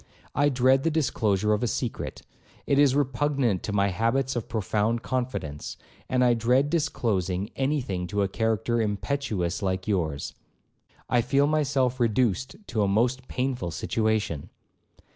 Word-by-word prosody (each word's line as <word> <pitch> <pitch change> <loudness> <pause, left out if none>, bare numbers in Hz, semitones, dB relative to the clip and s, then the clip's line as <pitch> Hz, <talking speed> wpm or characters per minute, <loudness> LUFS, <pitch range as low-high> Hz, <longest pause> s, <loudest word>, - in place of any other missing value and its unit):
I 145 +1 +3
dread 130 0 +3
the 165 - +1
disclosure 105 - +1
of 105 - 0
a 120 - +1
secret; 115 +1 -3 0.4
it 140 - +2
is 140 -2 +5
repugnant 135 -6 +1
to - - -4
my 100 -1 +2
habits 120 +7 0
of 120 - -3
profound 110 +1 0
confidence; 120 - -3 0.3
and 130 -1 +2
I 120 -1 +5
dread 125 +5 +2
disclosing 105 - 0
any 140 +2 +1
thing 90 -7 -3
to 100 +3 0
a - - +1
character 115 +3 0
impetuous 105 -4 -1
like 95 -1 -2
yours. 80 -8 -1 0.7
I 120 -1 +3
feel 135 +4 +2
myself 140 -4 +1
reduced 120 - +1
to 110 - -1
a 100 - +3
most 120 +6 +1
painful 125 -8 -2
situation.' 110 -3 -1
120 Hz, 145 wpm, -26 LUFS, 100-135 Hz, 0.7 s, is